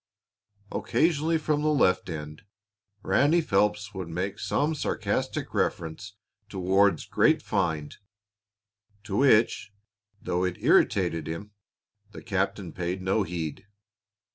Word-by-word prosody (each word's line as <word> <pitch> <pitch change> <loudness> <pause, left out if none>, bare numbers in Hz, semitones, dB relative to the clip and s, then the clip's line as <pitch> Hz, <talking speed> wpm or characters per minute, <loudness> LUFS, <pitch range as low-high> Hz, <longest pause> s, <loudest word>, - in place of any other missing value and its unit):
Occasionally, 160 0 +1
from 150 -1 0
left 145 -12 +2
end, 75 -2 -7 0.6
Ranny 145 - +3
Phelps 105 - 0
would 95 -3 -6
make 95 +4 -3
some 150 +3 0
sarcastic 150 - -2
reference 90 +5 -2 0.3
to 100 - -8
Ward's 95 -1 +2
"great - - +2
find," 75 -3 -1 1.1
to 105 -2 -5
which, 115 -5 +3 0.5
though 90 0 -1
it 90 -1 -1
irritated 80 -1 +2
him, 85 +6 -6 0.6
the - - -10
captain 95 -3 -2
paid 90 +1 -3
no 95 +3 +1
heed. 90 +1 -4
95 Hz, 110 wpm, -27 LUFS, 90-115 Hz, 1.1 s, Ranny